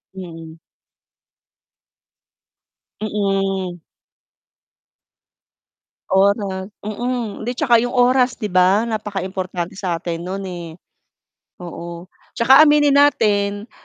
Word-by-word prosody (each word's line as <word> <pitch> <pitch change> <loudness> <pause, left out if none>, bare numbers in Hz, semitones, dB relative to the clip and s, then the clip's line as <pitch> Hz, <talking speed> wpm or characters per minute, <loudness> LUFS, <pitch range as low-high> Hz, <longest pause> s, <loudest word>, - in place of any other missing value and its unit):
Mm. 165 -3 -10 2.4
Mm. 195 -4 -2 2.3
Oras, 195 0 +1
mm. 225 0 -4
'Di 245 - -1
'tsaka 245 -3 +3
'yong 245 +2 -1
oras 250 0 +3
'di 210 - -3
ba 185 +5 +3
napakaimportante 190 -4 -4
sa 180 -4 -2
atin 170 -1 -3
no'n, 195 +2 -4
eh. 175 -2 -7 1.0
Oo, 170 +1 -8 0.3
'tsaka 260 +4 +6
aminin 295 -1 +4
natin, 205 -6 +2
200 Hz, 80 wpm, -20 LUFS, 185-235 Hz, 2.4 s, tsaka